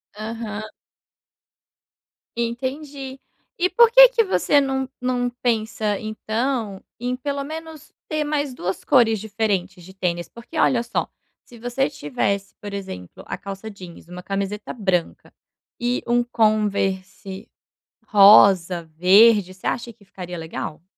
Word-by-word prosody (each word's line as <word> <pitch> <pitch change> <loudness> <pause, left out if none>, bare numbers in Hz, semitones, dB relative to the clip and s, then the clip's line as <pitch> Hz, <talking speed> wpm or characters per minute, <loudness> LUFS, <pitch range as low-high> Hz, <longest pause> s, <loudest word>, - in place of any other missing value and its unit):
Aham. 215 0 -6 1.7
Entendi. 265 +3 -4 0.4
E 365 +1 +2
por 470 -1 +5
que - - +10
que 480 -2 +2
você 290 -7 +3
não 265 -1 -1
não 250 -1 0
pensa 220 -4 -1
então 220 -1 -3 0.2
em 250 +1 -2
pelo 280 +1 -3
menos 315 0 -9 0.2
ter 310 -1 -1
mais 290 -3 -2
duas 190 -5 -4
cores 230 -6 +4
diferentes 200 -4 -2
de 190 +2 -13
tênis? 175 -2 -2
Porque 235 +8 -11
olha 245 -5 +3
só, 240 - -2 0.3
se 235 -2 -16
você 245 +4 -1
tivesse, 195 - -2
por 205 -1 -7
exemplo, 95 - -8
a - - -4
calça 200 +2 -7
jeans, 180 -5 -12
uma 180 +1 -9
camiseta 200 +1 -3
branca 190 -7 -2 0.5
e 245 +1 0
um 240 0 +3
Converse 200 -4 -1 0.6
rosa, 195 -4 +6
verde, 195 +2 +5
você 190 - -16
acha 235 0 -2
que 210 -2 -22
ficaria 180 -2 -8
legal? 160 0 -6
220 Hz, 130 wpm, -22 LUFS, 195-255 Hz, 1.7 s, que